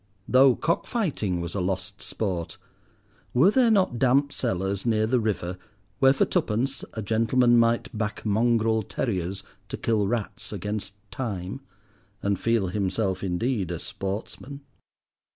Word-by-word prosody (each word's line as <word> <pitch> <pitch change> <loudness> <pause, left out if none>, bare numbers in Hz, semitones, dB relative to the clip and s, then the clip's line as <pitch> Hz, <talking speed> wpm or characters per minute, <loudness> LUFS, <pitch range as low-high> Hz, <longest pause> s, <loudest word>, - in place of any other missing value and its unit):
Though 130 0 +6
cockfighting 160 - -1
was 85 -1 -5
a 100 - -1
lost 95 +2 -3
sport, 90 -6 -3 0.8
were 160 +11 +6
there 250 0 +4
not 190 - +2
damp 135 +2 +3
cellars 95 -4 -1
near 110 -2 +2
the 125 +3 +2
river 95 -5 -2 0.4
where 135 0 +6
for 135 - +2
twopence 125 +5 -1
a 110 - -4
gentleman 120 +3 +3
might 115 0 +1
back 105 0 -3
mongrel 110 +1 +2
terriers 95 -3 -3 0.3
to - - -4
kill 110 -3 +1
rats 115 -1 -3
against 105 -1 -4 0.2
time, 110 -2 -4 0.6
and 100 -1 0
feel 115 -5 +1
himself 95 0 -1
indeed 95 +1 -1
a 85 - -3
sportsman? 110 - -6
110 Hz, 135 wpm, -26 LUFS, 95-125 Hz, 0.8 s, Though